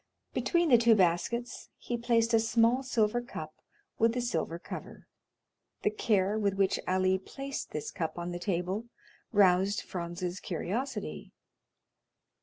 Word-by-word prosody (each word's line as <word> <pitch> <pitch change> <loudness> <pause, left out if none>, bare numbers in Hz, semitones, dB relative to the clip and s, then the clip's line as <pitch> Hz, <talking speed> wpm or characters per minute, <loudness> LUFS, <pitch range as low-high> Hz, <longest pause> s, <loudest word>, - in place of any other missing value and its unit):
Between 345 -2 +2
the 240 -3 +7
two 230 -1 +6
baskets 195 +6 0
he 240 - -4
placed 230 -1 +2
a 225 - +6
small 230 +2 +3
silver 240 -3 +1
cup 155 -10 -7 0.5
with 230 +2 +3
a - - +1
silver 170 -8 -2
cover. - - -9 0.8
The 425 - +2
care 215 - +1
with 200 -2 +1
which 195 -1 +2
Ali 185 0 +2
placed 275 +7 -6
this 150 - -4
cup 165 -4 -3
on 175 0 -4
the 175 - -4
table 185 +4 -2 0.5
roused 195 0 +4
Franz's 175 +1 -4
curiosity. 210 - -4
205 Hz, 135 wpm, -30 LUFS, 180-235 Hz, 0.8 s, the